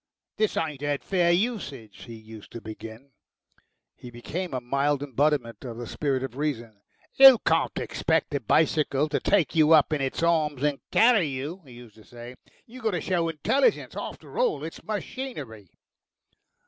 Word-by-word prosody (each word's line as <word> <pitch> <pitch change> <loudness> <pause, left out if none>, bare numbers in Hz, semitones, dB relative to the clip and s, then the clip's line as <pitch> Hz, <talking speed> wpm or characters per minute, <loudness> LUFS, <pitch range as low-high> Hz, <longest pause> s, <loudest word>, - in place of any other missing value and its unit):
"This 215 -1 0
ain't 150 -4 -3
'ad 145 -1 -2
fair 175 -3 +2
usage," 170 - -3
he 115 - -9
used 110 -1 -13
to 115 - -6
begin. 110 +4 -10 0.8
He 125 - -11
became 160 +10 -5
a 130 - -2
mild 140 +3 0
embodiment 140 -3 -1
of 120 -3 -7
the 120 - -6
spirit 135 0 -2
of 130 -1 -6
reason. 120 -8 -4 0.3
"You 270 -2 +9
can't - - +1
expect - - -1
a 140 - 0
bicycle 150 +3 +1
to 150 - 0
take 195 -6 +1
you 155 0 +5
up 155 0 +5
in 150 - -1
its 135 +4 -2
arms 155 -5 +1
and 145 -2 0
carry 225 -7 +4
you," 145 +7 -5
he 130 - -14
used 120 -3 -14
to 110 - -16
say. 120 +2 -11 0.3
"You 255 +3 -12
got 220 -2 0
to 175 - -2
show 170 -2 0
intelligence. 215 - 0
After - - -7
all - - +1
it's 160 - -8
machinery." 200 - -6
145 Hz, 170 wpm, -26 LUFS, 120-170 Hz, 0.8 s, You